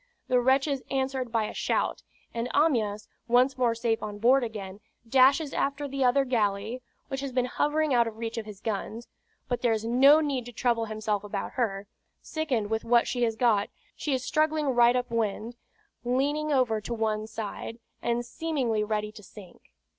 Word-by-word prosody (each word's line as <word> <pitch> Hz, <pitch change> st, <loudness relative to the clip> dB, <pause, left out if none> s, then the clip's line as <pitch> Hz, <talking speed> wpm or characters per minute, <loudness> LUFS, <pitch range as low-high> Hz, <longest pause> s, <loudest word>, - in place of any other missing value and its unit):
The 250 Hz, -, +4 dB
wretches 270 Hz, +2 st, +2 dB
answered 265 Hz, -2 st, -1 dB
by 225 Hz, -2 st, +1 dB
a -, -, -6 dB
shout; -, -, -1 dB, 0.3 s
and 235 Hz, +1 st, -2 dB
Amyas, 220 Hz, -9 st, +1 dB, 0.2 s
once 250 Hz, +3 st, +4 dB
more 245 Hz, -3 st, +1 dB
safe 230 Hz, -1 st, 0 dB
on 210 Hz, -1 st, -5 dB
board 250 Hz, +5 st, +4 dB
again, 205 Hz, -4 st, -6 dB, 0.3 s
dashes 270 Hz, +4 st, +4 dB
after 280 Hz, +1 st, -1 dB
the 275 Hz, 0 st, -2 dB
other 265 Hz, +2 st, +3 dB
galley, 225 Hz, 0 st, -1 dB, 0.3 s
which 270 Hz, -1 st, -3 dB
has 275 Hz, -1 st, -4 dB
been 250 Hz, -1 st, +1 dB
hovering 295 Hz, +3 st, 0 dB
out 235 Hz, -1 st, +4 dB
of 220 Hz, -1 st, -7 dB
reach 230 Hz, 0 st, -4 dB
of 220 Hz, -, -8 dB
his 205 Hz, -1 st, -10 dB
guns; 220 Hz, +2 st, -4 dB, 0.4 s
but 245 Hz, -, -2 dB
there 235 Hz, -2 st, +3 dB
is 220 Hz, 0 st, -2 dB
no 270 Hz, +6 st, +6 dB
need 275 Hz, -6 st, -2 dB
to -, -, -7 dB
trouble 235 Hz, -1 st, 0 dB
himself 215 Hz, -2 st, -2 dB
about 205 Hz, -, -4 dB
her; 205 Hz, -5 st, -2 dB, 0.3 s
sickened 260 Hz, -10 st, -2 dB
with 220 Hz, 0 st, 0 dB
what 235 Hz, 0 st, +3 dB
she 245 Hz, -, -2 dB
has 225 Hz, -2 st, +1 dB
got, 220 Hz, -4 st, +2 dB, 0.3 s
she 300 Hz, -, -3 dB
is 255 Hz, -1 st, -4 dB
struggling 310 Hz, -1 st, +1 dB
right 240 Hz, -1 st, +5 dB
up 250 Hz, -1 st, -1 dB
wind, 225 Hz, +1 st, -2 dB, 0.5 s
leaning 285 Hz, +5 st, 0 dB
over 245 Hz, -6 st, +2 dB
to 235 Hz, +3 st, -4 dB
one 215 Hz, -1 st, -1 dB
side, 220 Hz, +1 st, -6 dB, 0.2 s
and 240 Hz, 0 st, -1 dB
seemingly 250 Hz, -6 st, -1 dB
ready 210 Hz, 0 st, -2 dB
to 215 Hz, -, -13 dB
sink. 195 Hz, -2 st, -15 dB
240 Hz, 185 wpm, -27 LUFS, 220-265 Hz, 0.5 s, no